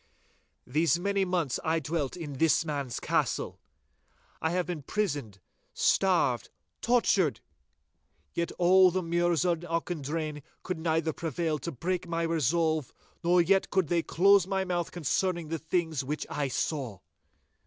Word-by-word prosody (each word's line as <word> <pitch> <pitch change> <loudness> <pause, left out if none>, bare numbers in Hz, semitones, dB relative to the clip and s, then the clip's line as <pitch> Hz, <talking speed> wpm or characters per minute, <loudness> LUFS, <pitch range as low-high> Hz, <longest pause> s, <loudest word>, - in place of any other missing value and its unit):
These 155 +4 +2
many 200 +2 0
months 175 -8 -1
I 160 +1 +1
dwelt 155 -1 -3
in 145 -6 -6
this 165 0 +3
man's 140 -5 -3
castle. - - -1 0.8
I 160 - +1
have 180 +1 0
been 175 -4 -4
prisoned, 145 - -2 0.4
starved, 170 - +2 0.3
tortured—yet 150 - -2
all 185 +1 +6
the 185 +1 -1
Mures 175 0 +1
in 165 - -5
Auchendrayne 160 -3 -3 0.2
could 180 -3 -3
neither 160 -1 0
prevail 160 -1 -2
to 170 - -4
break 175 +6 -3
my 170 0 -1
resolve, 160 -2 +1 0.3
nor 175 +1 +4
yet 195 +3 +2
could 190 -5 +1
they 170 -1 +2
close 195 +2 +4
my 190 -1 0
mouth 175 -2 -1
concerning 175 0 -1
the 165 0 -2
things 160 -3 -1
which 150 +3 -3
I 145 -1 -1
saw. 130 -4 -2
165 Hz, 135 wpm, -29 LUFS, 150-180 Hz, 0.8 s, all